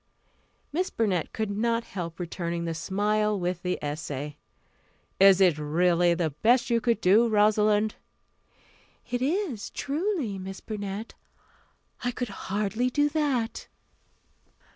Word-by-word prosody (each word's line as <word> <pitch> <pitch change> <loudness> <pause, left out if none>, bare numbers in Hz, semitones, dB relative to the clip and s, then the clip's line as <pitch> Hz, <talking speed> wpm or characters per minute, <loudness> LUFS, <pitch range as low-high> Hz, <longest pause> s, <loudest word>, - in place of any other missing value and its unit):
Miss 365 +4 0
Burnett 195 -7 0
could 220 -2 -2
not 230 +3 0
help 170 -6 -6
returning 170 -1 -3
the 165 - -2
smile 210 +5 0
with 175 0 -2
the 180 0 -1
essay. 145 -1 -4 0.8
"Is 195 -1 +7
it 175 -6 +4
really 170 +3 +2
the 165 -2 0
best 240 - +2
you 230 0 +3
could 235 -2 +1
do, 210 +6 +5
Rosalind?" 210 0 +3 1.2
"It 245 0 -1
is, 285 - -1
truly, 290 - -2
Miss 190 +1 -7
Burnett. 205 0 -5 0.9
I 245 - +1
could 245 -1 -3 0.2
hardly 210 +5 0
do 290 +3 +2
that." 280 -7 -1
210 Hz, 120 wpm, -27 LUFS, 180-235 Hz, 1.2 s, Is